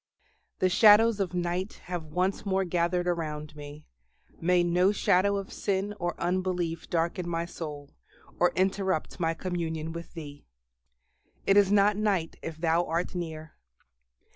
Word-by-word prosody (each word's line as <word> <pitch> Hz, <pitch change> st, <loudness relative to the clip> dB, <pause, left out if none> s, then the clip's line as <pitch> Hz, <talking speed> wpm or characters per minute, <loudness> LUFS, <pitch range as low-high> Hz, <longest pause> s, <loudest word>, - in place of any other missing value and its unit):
The 185 Hz, -, +2 dB
shadows 215 Hz, +3 st, +6 dB
of 180 Hz, -3 st, -2 dB
night 180 Hz, +3 st, -2 dB
have 175 Hz, -3 st, -5 dB
once 180 Hz, +5 st, -1 dB
more 195 Hz, -1 st, +1 dB
gathered 175 Hz, 0 st, 0 dB
around 155 Hz, -3 st, -3 dB
me; 145 Hz, 0 st, -10 dB, 0.5 s
may 175 Hz, +1 st, +3 dB
no 180 Hz, +3 st, +3 dB
shadow 200 Hz, 0 st, +2 dB
of 195 Hz, -1 st, -6 dB
sin 200 Hz, +1 st, -1 dB
or 175 Hz, 0 st, -3 dB
unbelief 175 Hz, -2 st, -1 dB
darken 170 Hz, +1 st, -1 dB
my 170 Hz, 0 st, -1 dB
soul, 150 Hz, -4 st, -7 dB, 0.5 s
or 175 Hz, -, +4 dB
interrupt 190 Hz, -1 st, 0 dB
my 165 Hz, -1 st, 0 dB
communion 165 Hz, -3 st, -3 dB
with 170 Hz, +1 st, -8 dB
Thee. 145 Hz, -3 st, -9 dB, 1.0 s
"It 195 Hz, -, +4 dB
is 200 Hz, -1 st, +5 dB
not 205 Hz, 0 st, +4 dB
night 195 Hz, -6 st, 0 dB
if 165 Hz, -1 st, -6 dB
Thou 165 Hz, +1 st, +2 dB
art 170 Hz, +1 st, -2 dB
near." 160 Hz, -3 st, -6 dB
175 Hz, 140 wpm, -28 LUFS, 165-190 Hz, 1.0 s, shadows